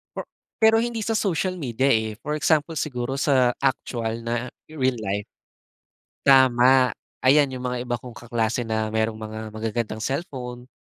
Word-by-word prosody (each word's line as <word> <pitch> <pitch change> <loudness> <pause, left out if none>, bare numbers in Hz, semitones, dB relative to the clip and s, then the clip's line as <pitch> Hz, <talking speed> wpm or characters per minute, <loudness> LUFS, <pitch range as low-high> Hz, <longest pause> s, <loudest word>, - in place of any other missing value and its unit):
Per - - -4 0.4
pero 220 0 +6
hindi 235 -1 -2
sa 225 - 0
social 185 -1 0
media, 130 0 0
eh, 110 -2 +1
for 150 - -2
example 155 +1 +2
siguro 135 -2 -3
sa 130 -4 +3
aktuwal 115 -4 -1
na 120 +1 -2 0.2
real 130 -4 0
life. 100 -1 -2 1.0
Tama. 130 -1 +5 0.3
Ayan 140 +2 +5
'yong 130 -1 -5
mga 125 0 -2
iba 120 -1 -2
kong 120 -1 -11
kaklase 120 0 -1
na 110 -1 -1
merong 110 0 0
mga 110 0 -7
magagandang 110 0 -3
cellphone 125 -4 -5
125 Hz, 150 wpm, -24 LUFS, 115-140 Hz, 1.0 s, pero